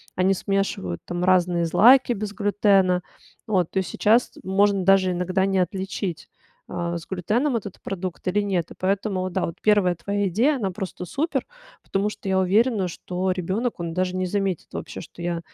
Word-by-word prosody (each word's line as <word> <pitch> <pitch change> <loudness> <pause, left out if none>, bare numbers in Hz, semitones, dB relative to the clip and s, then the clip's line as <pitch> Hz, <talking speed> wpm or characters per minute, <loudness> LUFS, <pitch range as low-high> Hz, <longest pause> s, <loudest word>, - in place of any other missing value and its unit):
Они 185 +1 +3
смешивают 195 - -2
там 175 0 -3
разные 180 -2 +3
злаки 245 +10 +6
без 205 -1 -5
глютена. 200 -3 +2 0.4
Вот, 185 -6 +1
то 190 - +1
сейчас 220 +6 +2
можно 195 0 +2
даже 195 -1 +5
иногда 185 +2 0
не 195 -1 +1
отличить, 185 -1 -3 0.4
а, 175 -1 -3
с 165 - -9
глютеном 225 - 0
этот 205 -3 -8
продукт 185 -2 -5
или 200 +3 +2
нет. 185 -5 -1
И - - -10
поэтому 195 0 0
вот 185 0 -3
да, 190 - 0
вот 165 - -6
1 205 -4 +3
твоя 200 +4 -1
идея, 250 - +2
она 200 -6 -2
просто 185 -1 -6
супер. 275 - -2 0.4
Потому 200 +2 -1
что 210 - -9
я 190 - +2
уверена, 200 +1 +2
что 180 +2 -3
ребенок, 190 +7 -2
он 170 -1 -4
даже 185 +1 -1
не 185 - 0
заметит 195 -2 -1
вообще, - - -6
что - - -12
я 170 -1 -2
190 Hz, 180 wpm, -24 LUFS, 180-205 Hz, 0.4 s, злаки